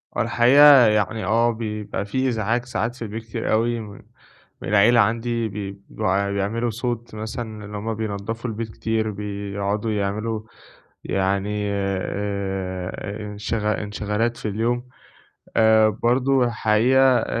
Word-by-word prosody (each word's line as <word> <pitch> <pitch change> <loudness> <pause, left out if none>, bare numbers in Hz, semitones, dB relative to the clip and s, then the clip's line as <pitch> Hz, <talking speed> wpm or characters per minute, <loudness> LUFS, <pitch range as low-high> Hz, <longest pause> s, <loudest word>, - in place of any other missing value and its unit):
آه - - +1
الحقيقة، 135 +1 +7
يعني 105 0 +1
آه، 115 +4 +3
بيبقى 105 -3 -4
في 130 +6 -1
إزعاج 115 +2 -1
ساعات 120 -1 -2
في 130 - -16
البيت 110 +1 -5
كتير 110 - -4
أوي، 115 +1 +1
م 105 -2 -9 0.6
من - - -6
العيلة 110 +3 +5
عندي 115 +1 +1
بي 100 -1 -6
بيع 100 -1 0
بيعملوا 110 +4 -1
صوت، 115 0 -4
مثلًا 110 -1 -6
اللي 105 0 -7
هُم 110 +2 -3
بينضّفوا 110 +2 -4
البيت 110 0 -4
كتير، 110 -1 -1
بيقعدوا 100 +1 -3
يعملوا 105 +2 -2 0.6
يعني 100 +2 -1
آآ 95 -1 -3 0.3
إنشغ 105 +1 -2
انشغالات 105 +3 -2
في - - -5
اليوم، 120 +4 -1 0.7
آآ 110 -1 +5
برضه 125 +4 +2
الحقيقة 115 +3 +3 0.2
آآ - - -2
110 Hz, 130 wpm, -23 LUFS, 100-115 Hz, 0.7 s, الحقيقة